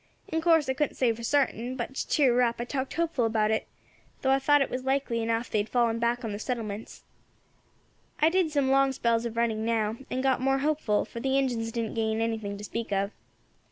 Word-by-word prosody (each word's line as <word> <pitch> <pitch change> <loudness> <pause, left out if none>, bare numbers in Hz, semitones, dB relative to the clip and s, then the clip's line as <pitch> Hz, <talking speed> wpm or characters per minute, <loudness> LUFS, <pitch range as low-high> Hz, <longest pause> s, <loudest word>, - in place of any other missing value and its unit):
In 320 0 -1
course 325 -3 +4
I 265 - +1
couldn't 295 +2 -1
say 245 -3 +2
for 230 - -10
sartin, 255 -1 0
but, 255 +1 -4
to - - -3
cheer 270 -5 +3
her 250 - +3
up, 235 -1 +2
I 240 - -3
talked 265 +1 -3
hopeful 325 -7 0
about 220 -1 +1
it, 220 - -1 0.6
though 265 - +3
I 270 - +4
thought 290 +1 +4
it - - -5
was 255 0 -3
likely 265 -3 0
enough 230 +1 -1
they 215 - +2
had 205 +1 -2
fallen 235 -2 +1
back 235 +1 0
on 220 - -3
the 205 - -5
settlements. 220 -3 -5 1.2
I 310 - +5
did 360 -1 +2
some 280 -3 +1
long 275 0 +4
spells 235 -2 +1
of 230 0 -8
running 225 -2 0
now, 225 -1 0
and 260 +1 -2
got 265 -2 +2
more 270 +1 +2
hopeful, 280 -7 0
for 235 - -8
the 270 +2 +1
Injins 240 -4 0
didn't 230 -2 -3
gain 220 -1 0
anything 220 -3 -2
to 205 - -9
speak 225 +1 -5
of. 200 +1 0
240 Hz, 225 wpm, -28 LUFS, 225-270 Hz, 1.2 s, I